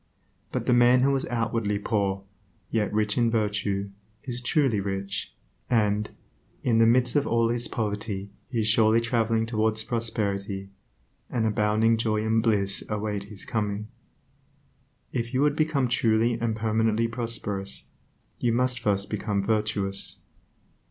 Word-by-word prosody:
But - - -2
the - - +3
man 120 +1 +5
who 135 +1 +3
is 135 - -2
outwardly 115 -3 -1
poor, 100 -2 -1 0.5
yet 105 -3 0
rich 105 +1 +1
in 120 -1 +3
virtue, 105 -3 -1 0.3
is 125 -3 -4
truly 125 -3 +2
rich, 100 0 -4 0.3
and, 105 -2 +2 0.5
in 115 -2 +3
the 115 - +6
midst 125 +1 +3
of 145 - +2
all 115 0 +2
his 120 0 -1
poverty 105 -2 -3 0.2
he 120 -3 0
is 105 - -1
surely 110 +1 +4
traveling 115 -1 +1
towards 110 -1 0
prosperity; 100 -4 -2 0.6
and 115 -2 0
abounding 110 +1 +2
joy 110 -1 0
and 110 0 +2
bliss 100 -4 +1
await 105 -1 -2
his 100 -1 -11
coming. 105 -1 -2 1.2
If 120 +1 -3
you 130 - +2
would 145 0 +3
become 155 -4 +1
truly 115 -1 +2
and 115 -1 -1
permanently 110 +1 +1
prosperous, 115 -4 -3 0.5
you 120 - +1
must 125 +1 +1
first 100 -1 0
become 105 -1 -1
virtuous. 105 -2 0
110 Hz, 140 wpm, -26 LUFS, 105-115 Hz, 1.2 s, the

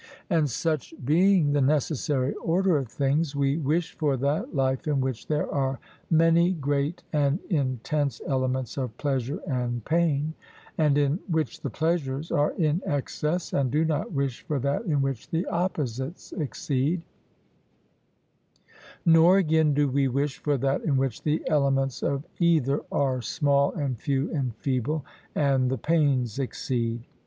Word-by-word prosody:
And 160 -4 +3
such 155 +4 -2
being 170 0 +4
the 145 - +2
necessary 140 -1 +1
order 180 +1 +2
of 135 -3 -2
things, 140 +5 0
we 140 +1 +1
wish 160 +3 0
for 145 -4 +1
that 150 - -1
life 130 +1 0
in 145 -2 +1
which 130 -3 -3
there 150 -1 0
are 135 -1 -1 0.3
many 165 +2 +4
great 145 +2 -1
and 145 0 +2
intense 140 -1 0
elements 130 -1 -1
of 125 -4 -4
pleasure 135 -1 -1
and 120 -4 -2
pain, 155 -2 +1 0.4
and 150 -3 +3
in 145 +3 +2
which 160 - -1
the 140 - -3
pleasures 155 0 -1
are 145 +1 +2
in 160 +1 +1
excess, 150 +2 -2
and 135 -2 +1
do 155 +5 +2
not 155 -1 -1
wish 140 -5 -2
for 150 -4 0
that 140 - -1
in 145 -6 +1
which 135 -5 -3
the 165 +4 -1
opposites 155 -5 -3
exceed; 150 +1 -1 2.0
nor, 165 +3 +6
again, 160 -4 +3
do 145 0 +3
we 135 +1 +1
wish 140 +2 -1
for 145 -2 0
that 135 +2 0
in 140 -4 +1
which 130 -4 -1
the 155 +1 0
elements 135 -3 +1
of 140 +2 -1
either 155 -5 +3
are 130 -3 +1
small 140 +2 +2
and 135 -8 -3
few 140 +3 -1
and 130 -7 -2
feeble, 135 +4 -1 0.3
and 135 -3 +2
the 130 - -1
pains 140 -5 +1
exceed. 120 -3 -2
145 Hz, 150 wpm, -26 LUFS, 135-160 Hz, 2.0 s, nor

